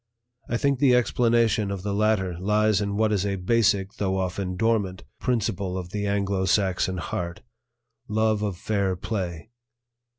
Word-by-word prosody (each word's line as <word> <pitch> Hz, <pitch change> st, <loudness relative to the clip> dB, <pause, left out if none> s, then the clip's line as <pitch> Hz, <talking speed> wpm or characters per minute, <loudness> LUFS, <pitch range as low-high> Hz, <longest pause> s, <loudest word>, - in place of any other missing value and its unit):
I 120 Hz, -, +1 dB
think 140 Hz, 0 st, +1 dB
the 130 Hz, -3 st, +5 dB
explanation 115 Hz, -3 st, +2 dB
of 100 Hz, -2 st, -4 dB
the 100 Hz, -1 st, -2 dB
latter 100 Hz, -4 st, +1 dB
lies 105 Hz, +1 st, +2 dB
in 100 Hz, 0 st, -2 dB
what 110 Hz, 0 st, +2 dB
is 100 Hz, -2 st, +1 dB
a 100 Hz, -1 st, -1 dB
basic, 100 Hz, 0 st, +1 dB
though 95 Hz, -2 st, 0 dB
often 95 Hz, 0 st, -2 dB
dormant, 100 Hz, -4 st, 0 dB, 0.2 s
principle 100 Hz, -6 st, -1 dB
of 90 Hz, -1 st, -6 dB
the 105 Hz, 0 st, -2 dB
Anglo 100 Hz, -1 st, 0 dB
Saxon 95 Hz, -1 st, +1 dB
heart, 85 Hz, -1 st, -4 dB, 0.7 s
love 110 Hz, 0 st, +1 dB
of 100 Hz, -4 st, -2 dB
fair 100 Hz, -2 st, 0 dB
play. 90 Hz, 0 st, -4 dB
100 Hz, 155 wpm, -25 LUFS, 95-110 Hz, 0.7 s, the